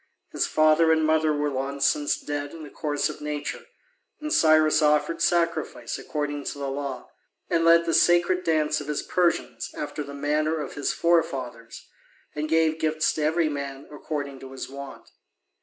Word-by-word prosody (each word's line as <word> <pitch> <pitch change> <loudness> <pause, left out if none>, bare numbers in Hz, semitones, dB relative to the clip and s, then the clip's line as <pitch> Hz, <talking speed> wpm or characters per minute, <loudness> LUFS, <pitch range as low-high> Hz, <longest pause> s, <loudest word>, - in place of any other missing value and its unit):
His - - 0
father 155 +1 +4
and 160 -1 +3
mother 155 0 +3
were 145 0 0
long 135 +1 -3
since 145 +1 +1
dead 145 +1 -5
in 160 - -9
the 150 - -10
course 145 -1 -1
of 155 - -8
nature, 150 -1 -5 0.5
and 305 0 -3
Cyrus 155 0 +5
offered 150 +2 +2
sacrifice 170 -1 0
according 145 -1 -4
to - - -4
the 140 -1 -3
law, 140 -1 -5 0.4
and 165 -1 +2
led 170 0 +6
the 165 - 0
sacred 175 +1 +3
dance 150 -2 +1
of 145 - -9
his 150 -1 -2
Persians 175 -2 0
after 150 +1 -5
the 140 0 -9
manner 155 +2 0
of 145 - -5
his 145 - -1
forefathers, 130 -9 -1 0.5
and 150 +1 -3
gave 160 0 +2
gifts 155 -1 +1
to 155 - -4
every 160 +2 +2
man 140 -2 -5
according 145 -2 -5
to 135 0 -10
his 130 - -6
wont. 140 0 -10
150 Hz, 175 wpm, -25 LUFS, 145-160 Hz, 0.5 s, led